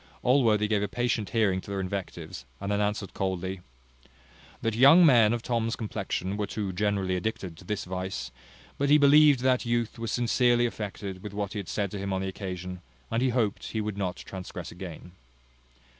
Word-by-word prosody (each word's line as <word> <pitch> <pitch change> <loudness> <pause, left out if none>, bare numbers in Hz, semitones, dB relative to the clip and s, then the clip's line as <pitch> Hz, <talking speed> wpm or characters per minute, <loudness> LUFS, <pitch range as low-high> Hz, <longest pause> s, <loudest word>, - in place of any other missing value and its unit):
Allworthy 115 -5 +3
gave 105 -1 +1
a 105 - 0
patient 120 -1 -1
hearing 100 -5 +1
to - - -12
their 100 -1 -2
invectives, 95 -6 -5 0.2
and 100 - -3
then 105 0 +1
answered 105 -1 -2
coldly: 95 0 -2 1.0
"That 115 - +1
young 140 +9 +8
men 115 -7 +6
of 120 -1 -2
Tom's 115 -2 0
complexion 100 -2 -3
were 105 -1 -1
too 100 -3 -3
generally 100 -1 0
addicted 95 -3 -3
to - - -14
this 105 -2 -3
vice; 90 -8 -4 0.5
but 140 0 +1
he 150 - +7
believed 145 -2 +6
that 130 -1 +2
youth 120 -1 -1
was 115 -1 -3
sincerely 120 0 +3
affected 100 -4 -5
with 105 0 -8
what 100 -2 -3
he 105 - -3
had 100 - -7
said 100 -3 -1
to 100 - -5
him 100 0 -3
on 95 0 -1
the - - -2
occasion, 90 -2 -6 0.3
and 115 - +1
he 130 - +3
hoped 115 -4 0
he 110 - -1
would 105 -1 -2
not 95 -3 -2
transgress 95 -2 -8
again." 90 0 -9
105 Hz, 190 wpm, -28 LUFS, 95-115 Hz, 1.0 s, young